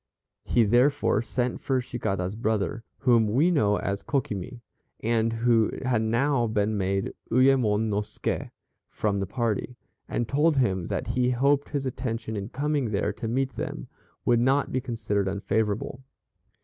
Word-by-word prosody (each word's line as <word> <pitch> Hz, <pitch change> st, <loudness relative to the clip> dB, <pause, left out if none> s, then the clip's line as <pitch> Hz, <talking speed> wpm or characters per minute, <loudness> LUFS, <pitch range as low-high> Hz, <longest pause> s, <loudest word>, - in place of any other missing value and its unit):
He 120 Hz, -, +3 dB
therefore 125 Hz, +4 st, +3 dB
sent 120 Hz, +2 st, -2 dB
for 130 Hz, -1 st, +1 dB
Cicada's 100 Hz, -7 st, -2 dB
brother 110 Hz, -1 st, -1 dB, 0.2 s
whom 120 Hz, -4 st, +4 dB
we 140 Hz, +12 st, +3 dB
know 105 Hz, -11 st, +3 dB
as 100 Hz, 0 st, -2 dB
Kokimi, 120 Hz, -3 st, -3 dB, 0.4 s
and 115 Hz, 0 st, +1 dB
who 115 Hz, -1 st, +3 dB, 0.2 s
had 120 Hz, -3 st, +2 dB
now 120 Hz, +3 st, +1 dB
been 105 Hz, 0 st, 0 dB
made 95 Hz, 0 st, -1 dB, 0.2 s
Uyemon 125 Hz, -4 st, +4 dB
no 105 Hz, -1 st, 0 dB
Ske 105 Hz, -, -4 dB, 0.4 s
from 100 Hz, -2 st, -1 dB
the 95 Hz, -, -2 dB
party, 115 Hz, +2 st, -2 dB, 0.3 s
and 120 Hz, -, -1 dB
told 150 Hz, +3 st, +2 dB
him 95 Hz, -9 st, +1 dB
that -, -, -3 dB
he 125 Hz, 0 st, +1 dB
hoped 140 Hz, +3 st, +2 dB
his 140 Hz, -2 st, -2 dB
attention 115 Hz, -3 st, -3 dB
in 100 Hz, +1 st, -4 dB
coming 145 Hz, -2 st, -1 dB
there 105 Hz, 0 st, 0 dB
to 115 Hz, -, -5 dB
meet 130 Hz, +3 st, 0 dB
them -, -, -5 dB, 0.4 s
would 120 Hz, -1 st, +4 dB
not 135 Hz, +3 st, +2 dB
be 130 Hz, -, 0 dB
considered 110 Hz, -5 st, -1 dB
unfavorable. 105 Hz, +5 st, -1 dB
115 Hz, 150 wpm, -26 LUFS, 105-130 Hz, 0.4 s, whom